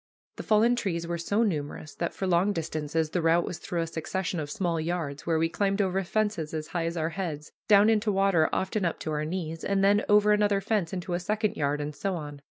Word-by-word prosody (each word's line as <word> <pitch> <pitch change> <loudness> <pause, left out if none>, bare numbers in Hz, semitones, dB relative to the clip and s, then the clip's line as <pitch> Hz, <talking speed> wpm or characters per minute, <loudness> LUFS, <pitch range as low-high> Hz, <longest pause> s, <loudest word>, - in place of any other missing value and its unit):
The - - -4
fallen 225 +3 +3
trees 170 -8 -2
were 170 0 -3
so 205 +7 +1
numerous 155 -5 -3
that 170 - -3
for 195 - -3
long 185 +3 +2
distances 155 -1 -2
the 180 - 0
route 165 +1 +3
was 175 - -5
through 170 -1 -3
a - - 0
succession 170 +2 -3
of 145 -2 -4
small 170 +1 -1
yards, 160 -4 -3
where 165 -1 +2
we 165 +1 +2
climbed 195 +4 0
over 195 -1 +1
fences 205 -5 -1
as 155 0 -4
high 170 -2 -1
as 170 +1 -4
our 160 0 0
heads, 160 -4 -5 0.2
down 205 0 +6
into 215 -1 +2
water 195 -5 +3
often 190 +2 -1
up 170 - 0
to 155 - -3
our 150 0 -1
knees, 165 -1 -4
and 195 0 +1
then 205 +2 +4
over 210 0 +5
another 205 -1 +3
fence 195 -4 -1
into 180 -1 -4
a 175 - 0
second 215 +3 -1
yard, 145 0 0
and 145 0 -4
so 195 +2 -2
on. 145 -3 -7
175 Hz, 235 wpm, -27 LUFS, 160-200 Hz, 0.2 s, down